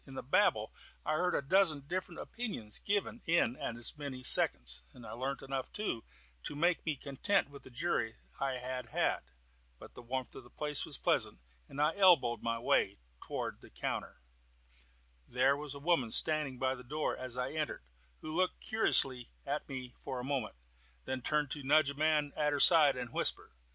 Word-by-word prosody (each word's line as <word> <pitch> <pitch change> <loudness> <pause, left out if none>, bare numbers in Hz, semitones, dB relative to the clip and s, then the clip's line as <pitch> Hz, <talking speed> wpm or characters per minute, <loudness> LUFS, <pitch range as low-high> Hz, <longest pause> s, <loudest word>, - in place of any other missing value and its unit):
In 135 - -10
the - - -5
babel 130 - +2 0.3
I - - 0
heard 180 +3 +1
a - - 0
dozen 160 -1 +3
different 175 +3 -5
opinions 200 - -4
given 205 +3 -1
in 165 -8 +2
as 120 +5 -1
many 135 -3 -6
seconds, 60 - +5
and 120 - -13
learnt 130 +4 -4
enough, 135 -1 -4
too, 210 - -3 0.4
to 145 - -5
make 170 +3 +1
me 155 - +1
content 145 +6 0
with 140 - -11
the - - -14
jury 125 -4 -1 0.2
I 135 -2 -1
had 125 0 -5
had. - - 0 0.6
But - - -13
the - - -11
warmth 125 +1 -4
of - - -10
the 120 - -17
place 150 +1 -3
was - - -5
pleasant, - - 0 0.3
and 140 - -8
I 150 +2 +2
elbowed 170 -12 +5
my 115 0 -1
way 100 -4 +1 0.3
forward - - -4
to - - -14
the - - -18
counter. - - -4 1.1
There 130 +3 +3
was 145 -1 -6
a - - -8
woman 145 -6 +1
standing 150 0 +4
by 130 +1 0
the 125 -1 -10
door 150 +5 -2
as 130 -1 +1
I 125 +1 -2
entered, 150 - -3 0.4
who 155 0 -5
looked 185 +1 0
curiously 130 - +1 0.2
at 145 +2 -3
me 130 -2 -6
for 130 -2 -4
a - - -5
moment, 130 - -2 0.5
then 130 -1 -3
turned 150 +1 0
to 145 - -3
nudge 145 +1 +4
a - - -7
man 150 0 +1
at 150 -1 +1
her 145 - -1
side, 155 -3 +8
and 125 -2 -6
whisper. - - -1
140 Hz, 190 wpm, -33 LUFS, 125-155 Hz, 1.1 s, side